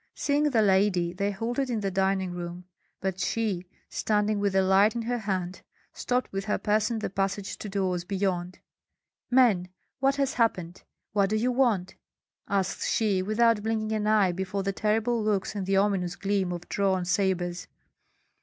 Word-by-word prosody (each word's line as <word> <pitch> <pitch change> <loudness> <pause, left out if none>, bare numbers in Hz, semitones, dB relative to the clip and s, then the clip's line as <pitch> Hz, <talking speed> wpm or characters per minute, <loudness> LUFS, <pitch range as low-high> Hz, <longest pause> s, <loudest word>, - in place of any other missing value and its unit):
Seeing 290 +1 +1
the 230 -5 +3
lady, 190 -3 +2
they 200 +2 -1
halted 240 +6 -2
in 225 -3 -1
the 195 -1 -1
dining 190 -1 0
room; 175 0 -6 0.4
but 190 -1 -2
she, 195 -4 -1 0.2
standing 210 -1 0
with 200 -1 0
a 190 - +4
light 195 +4 +4
in 235 - -2
her 245 +1 -1
hand, 190 -3 -3 0.3
stopped 250 +1 -1
with 195 0 -3
her 210 - 0
person 215 +2 +1
the 215 - -3
passage 195 0 -2
to 210 - -6
doors 185 -3 -1
beyond. 185 -1 -2 0.7
"Men, 230 -8 +4 0.3
what 270 +1 +2
has 275 -1 0
happened? 185 -7 0 0.3
What 200 -2 +2
do 215 - 0
you 240 +4 +1
want?" 235 -8 +1 0.5
asked 195 -2 -1
she, 205 -4 +1
without 215 +2 +2
blinking 220 0 -1
an 215 -1 -1
eye 210 -4 +4
before 190 +2 -3
the 195 0 -1
terrible 225 +3 +1
looks 205 -3 0
and 200 -3 -4
the 195 0 +2
ominous 195 -3 +1
gleam 195 -2 -1
of 175 -1 -6
drawn 190 -2 0
sabres. 180 -1 0
200 Hz, 170 wpm, -27 LUFS, 185-220 Hz, 0.7 s, a